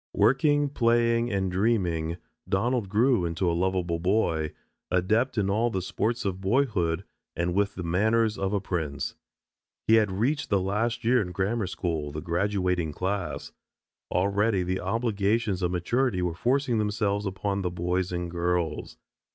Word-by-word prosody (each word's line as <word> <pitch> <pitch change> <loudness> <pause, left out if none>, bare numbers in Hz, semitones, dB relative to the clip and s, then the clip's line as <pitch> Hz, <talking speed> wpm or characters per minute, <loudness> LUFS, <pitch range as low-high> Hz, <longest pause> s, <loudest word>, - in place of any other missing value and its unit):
Working, 145 +2 +3
playing, 115 -2 +2
and 95 -2 0
dreaming, 90 -5 0 0.3
Donald 110 +2 0
grew 115 +1 +3
into 85 +2 -1
a 85 - +2
lovable 90 -1 0
boy, 85 -4 +1 0.4
adept 110 +8 +1
in 100 -2 +2
all 110 +4 +2
of 120 - -3
the 95 - 0
sports 115 +5 -1
of 95 -1 -2
boyhood 95 -6 +1 0.3
and 85 +1 -1
with 100 +2 +1
the 90 - -5
manners 110 +6 +2
of 95 -1 -2
a 105 - +1
prince. 80 -7 -3 0.7
He 110 - +6
had 105 -3 +2
reached 130 +10 0
the 100 - +3
last 115 +5 -1
year 120 +1 +4
in 90 -3 -4
grammar 100 +3 -1
school, 80 -5 -3
the 75 - -5
graduating 90 -1 0
class. 95 +5 -3 0.6
Already 100 +1 +2
the 95 +1 -1
obligations 110 -3 0
of 90 - +1
maturity 95 +3 0
were 90 -2 -1
forcing 125 +5 +1
themselves 105 -1 0
upon 100 +1 -2
the 90 - -1
boys 90 +1 -1
and 90 -1 -3
girls. 85 -1 -1
95 Hz, 155 wpm, -27 LUFS, 90-115 Hz, 0.7 s, He